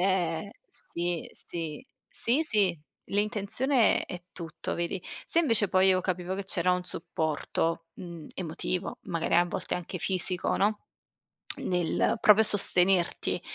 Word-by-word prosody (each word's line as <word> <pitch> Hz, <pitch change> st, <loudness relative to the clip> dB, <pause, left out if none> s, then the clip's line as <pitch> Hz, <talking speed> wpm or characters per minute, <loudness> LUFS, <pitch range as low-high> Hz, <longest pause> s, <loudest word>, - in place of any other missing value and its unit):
ehm, 180 Hz, -1 st, 0 dB, 0.4 s
sì, 175 Hz, -1 st, -2 dB, 0.2 s
sì. 165 Hz, -, -5 dB, 0.2 s
Sì 255 Hz, +7 st, +3 dB
sì, 200 Hz, -, +2 dB, 0.3 s
l'intenzione 215 Hz, +5 st, +2 dB
è 180 Hz, -2 st, -7 dB
tutto 165 Hz, -2 st, -5 dB
vedi. 170 Hz, +2 st, -3 dB, 0.2 s
Se 335 Hz, -, +2 dB
invece 230 Hz, -, +3 dB
poi 190 Hz, +1 st, +4 dB
io 185 Hz, -1 st, +4 dB
capivo 185 Hz, 0 st, -2 dB
che 200 Hz, -, -4 dB
c'era 180 Hz, -2 st, +1 dB
un 180 Hz, 0 st, 0 dB
supporto, 165 Hz, 0 st, -2 dB
mhmm, 170 Hz, -4 st, -9 dB
emotivo, 180 Hz, +1 st, -3 dB
magari 165 Hz, -1 st, -1 dB
a 175 Hz, +1 st, +6 dB
volte 180 Hz, +1 st, -3 dB
anche 180 Hz, +1 st, -5 dB
fisico, 185 Hz, +1 st, 0 dB
no, 210 Hz, +2 st, +1 dB, 0.8 s
nel 180 Hz, +5 st, +1 dB
proprio 215 Hz, +1 st, +7 dB
sostenerti 185 Hz, -3 st, +3 dB
180 Hz, 130 wpm, -28 LUFS, 170-200 Hz, 0.8 s, proprio